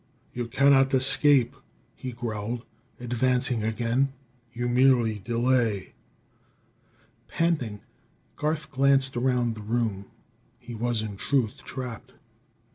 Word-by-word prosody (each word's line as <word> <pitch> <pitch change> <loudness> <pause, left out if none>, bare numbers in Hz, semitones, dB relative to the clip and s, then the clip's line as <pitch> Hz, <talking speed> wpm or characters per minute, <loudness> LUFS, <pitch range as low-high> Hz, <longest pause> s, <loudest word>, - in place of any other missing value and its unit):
"You 120 -1 -3
cannot 135 +2 +4
escape," 130 -1 +3 0.4
he 130 - -6
growled, 115 0 -4 0.3
advancing 125 0 0
again; 120 +5 0 0.4
"you 120 0 -3
merely 120 -3 +3
delay." 115 -2 0 1.3
Panting, 140 -12 -1 0.5
Garth 150 -1 -2
glanced 135 0 +3
around 120 -1 +1
the 110 - -9
room. 110 -3 -2 0.5
He 120 0 -10
was, 115 0 -1
in 105 -2 -6
truth, 125 -2 0
trapped. 125 -4 -7
120 Hz, 100 wpm, -26 LUFS, 115-130 Hz, 1.3 s, cannot